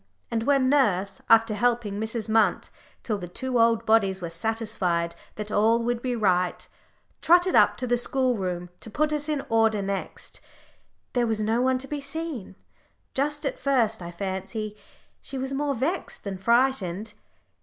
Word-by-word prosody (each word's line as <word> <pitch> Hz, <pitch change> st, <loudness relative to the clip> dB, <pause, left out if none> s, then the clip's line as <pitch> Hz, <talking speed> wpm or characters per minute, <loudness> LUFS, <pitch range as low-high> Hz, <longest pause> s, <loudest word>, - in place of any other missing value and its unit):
And 230 Hz, -1 st, 0 dB
when 270 Hz, +1 st, +3 dB
nurse, 200 Hz, -9 st, +2 dB
after 225 Hz, -1 st, +5 dB
helping 225 Hz, -2 st, 0 dB
Mrs. 220 Hz, 0 st, -3 dB
Munt 220 Hz, 0 st, +2 dB, 0.3 s
till 215 Hz, -4 st, -2 dB
the 175 Hz, -, -6 dB
two 250 Hz, +7 st, -2 dB
old 230 Hz, 0 st, +3 dB
bodies 200 Hz, -4 st, +3 dB
were 170 Hz, -2 st, -5 dB
satisfied 180 Hz, -4 st, -1 dB, 0.2 s
that 210 Hz, 0 st, -6 dB
all 225 Hz, +3 st, +3 dB
would 240 Hz, 0 st, -1 dB
be 250 Hz, -1 st, -1 dB
right, 180 Hz, -5 st, +1 dB, 0.5 s
trotted 355 Hz, +2 st, +4 dB
up -, -, +5 dB
to 255 Hz, -, -3 dB
the 245 Hz, 0 st, +2 dB
schoolroom 195 Hz, -9 st, -1 dB
to -, -, -11 dB
put 305 Hz, +7 st, 0 dB
us 300 Hz, 0 st, -2 dB
in 295 Hz, -2 st, -1 dB
order 225 Hz, -1 st, +3 dB
next, 195 Hz, 0 st, -5 dB, 0.7 s
there 245 Hz, -2 st, +2 dB
was 220 Hz, -1 st, -1 dB
no 225 Hz, +3 st, +1 dB
one 260 Hz, 0 st, +2 dB
to 265 Hz, +1 st, -7 dB
be 295 Hz, 0 st, -4 dB
seen! 280 Hz, -, -5 dB, 0.6 s
Just 295 Hz, +2 st, -1 dB
at -, -, -2 dB
first, 235 Hz, -7 st, +1 dB
I 170 Hz, -, -6 dB
fancy, 195 Hz, +4 st, -4 dB, 0.5 s
she 270 Hz, -, -6 dB
was 265 Hz, +1 st, -2 dB
more 280 Hz, 0 st, -1 dB
vexed 310 Hz, +10 st, -3 dB
than 195 Hz, -2 st, -5 dB
frightened. 225 Hz, -3 st, +1 dB
225 Hz, 165 wpm, -26 LUFS, 200-260 Hz, 0.7 s, after